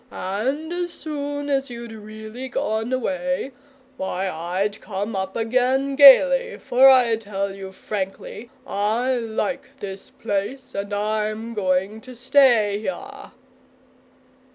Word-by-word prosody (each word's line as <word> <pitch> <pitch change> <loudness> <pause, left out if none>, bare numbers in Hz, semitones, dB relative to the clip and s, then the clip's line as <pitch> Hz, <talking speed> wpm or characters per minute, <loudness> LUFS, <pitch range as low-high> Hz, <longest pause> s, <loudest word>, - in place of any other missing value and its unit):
And 265 - -3
as 350 0 -2
soon 290 -2 -4
as 275 -2 0
you'd 235 -1 -8
really 220 +3 -8
gone 220 0 -2
away, 270 +1 -1 0.5
why, 190 0 -2
I'd 185 +5 -2
come 205 +1 -4
up 190 0 -3
again 255 +4 +1
gaily, 485 - +7
for 260 +2 +5
I 250 -3 +5
tell 200 -2 -4
you 195 -1 -8
frankly, 195 +3 -6 0.2
I 225 +4 0
like 240 +4 -3
this 195 -1 -7
place, 205 +7 -4
and 200 +1 -4
I'm 215 +2 -2
going 195 +1 0
to 255 0 -11
stay 240 -5 +4
here!" 220 +6 -7
225 Hz, 120 wpm, -23 LUFS, 205-265 Hz, 0.5 s, gaily